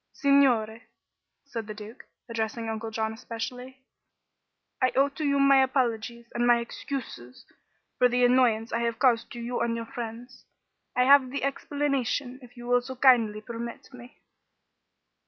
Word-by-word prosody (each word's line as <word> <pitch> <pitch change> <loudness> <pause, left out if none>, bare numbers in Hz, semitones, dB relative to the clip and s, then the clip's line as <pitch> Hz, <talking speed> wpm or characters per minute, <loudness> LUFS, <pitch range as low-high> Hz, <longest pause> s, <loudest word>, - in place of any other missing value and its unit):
"Signore," 245 -6 +3 0.6
said 230 -6 -6
the 215 - -7
Duke, 215 +4 -11 0.2
addressing 225 0 -3
Uncle 225 0 -4
John 220 0 -2
especially, 250 +3 -7 1.0
"I 255 -1 +3
owe 275 +1 +4
to 295 +3 -7
you 280 -1 +2
my 275 -1 +6
apologies 235 -3 -1
and 240 0 +1
my 240 0 +6
excuses 235 - -7 0.5
for 250 - +5
the 245 0 +3
annoyance 240 -3 +2
I 230 - +1
have 235 -1 -1
caused 235 -2 +2
to 240 - -7
you 240 +1 -3
and 235 -1 0
your 230 0 -4
friends. 240 +2 -8 0.5
I 250 - +4
have 270 0 +6
the 280 +1 -4
explanation, 275 -2 -2
if 245 0 -16
you 240 - -9
will 245 0 +3
so 260 +1 -8
kindly 235 -5 +4
permit 235 +3 -8
me." 250 0 -13
240 Hz, 155 wpm, -27 LUFS, 230-260 Hz, 1.0 s, my